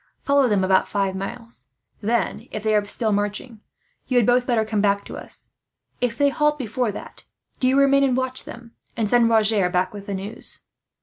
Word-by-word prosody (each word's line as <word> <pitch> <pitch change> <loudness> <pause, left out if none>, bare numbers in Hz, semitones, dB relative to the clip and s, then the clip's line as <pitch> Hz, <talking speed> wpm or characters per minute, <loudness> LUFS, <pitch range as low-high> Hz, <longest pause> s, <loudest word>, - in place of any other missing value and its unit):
"Follow 280 -2 +3
them 205 -4 +2
about 185 0 +3
five 195 -2 -1
miles; 230 +5 -6 0.3
then, 230 +2 -1
if 215 - -6
they 215 -1 +1
are 210 - +3
still 215 +2 0
marching, 205 +3 -2 0.5
you 255 - +1
had 240 - +4
both 245 +1 +3
better 230 -3 +2
come 215 -1 -1
back 200 -1 +1
to - - -8
us. - - -10 0.5
If 240 -2 -1
they 285 0 +4
halt 300 +1 +1
before 245 -2 -2
that, - - -10 0.4
do 255 - +2
you 265 +1 +3
remain 275 0 +5
and 260 -2 +2
watch 260 0 -2
them; 235 -1 -11 0.3
and 225 -2 +1
send 235 +1 +4
Roger 215 -4 +4
back 180 +1 0
with 200 -1 -9
the 200 - -3
news." 200 +5 -4
225 Hz, 200 wpm, -23 LUFS, 205-250 Hz, 0.5 s, remain